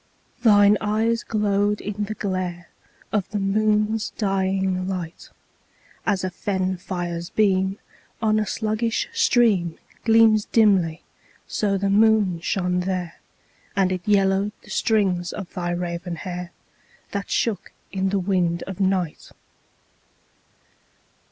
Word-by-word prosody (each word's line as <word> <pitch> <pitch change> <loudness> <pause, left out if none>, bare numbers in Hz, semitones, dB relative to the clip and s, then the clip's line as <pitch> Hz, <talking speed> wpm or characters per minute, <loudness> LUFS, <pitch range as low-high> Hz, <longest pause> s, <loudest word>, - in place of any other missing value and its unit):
3. 230 -3 +5
Thine 205 0 +6
eyes 225 +2 +1
glowed 205 -1 +1
in 210 0 -3
the 215 +1 -5
glare 185 -4 -3 0.4
Of 205 -4 -1
the 210 - -3
moon's 210 +2 +1
dying 190 -2 0
light; 180 -3 -5 0.8
As 200 -3 +1
a 185 - -2
fen 185 0 -2
fire's 175 -1 -4
beam 195 -2 +1 0.4
on 215 -1 +2
a 215 - -1
sluggish 220 +2 -1
stream 230 - +3 0.2
_15 - - -33
Gleams 225 -2 +5
dimly, 190 -7 +3 0.4
so 200 -2 0
the 195 0 0
moon 210 -4 +4
shone 180 +1 0
there, 180 -2 -3 0.6
And 190 -1 +2
it 185 -1 -2
yellowed 195 0 +2
the - - -13
strings 190 -5 +1
of 195 -3 -7
thy 175 -2 -3
raven 175 0 -3
hair, 180 +1 -6 0.6
That 200 -1 -4
shook 225 -4 -1 0.2
in 190 0 0
the 200 - 0
wind 180 -3 0
of 190 -1 -7
night. 185 -4 -1
195 Hz, 125 wpm, -23 LUFS, 180-210 Hz, 0.8 s, Thine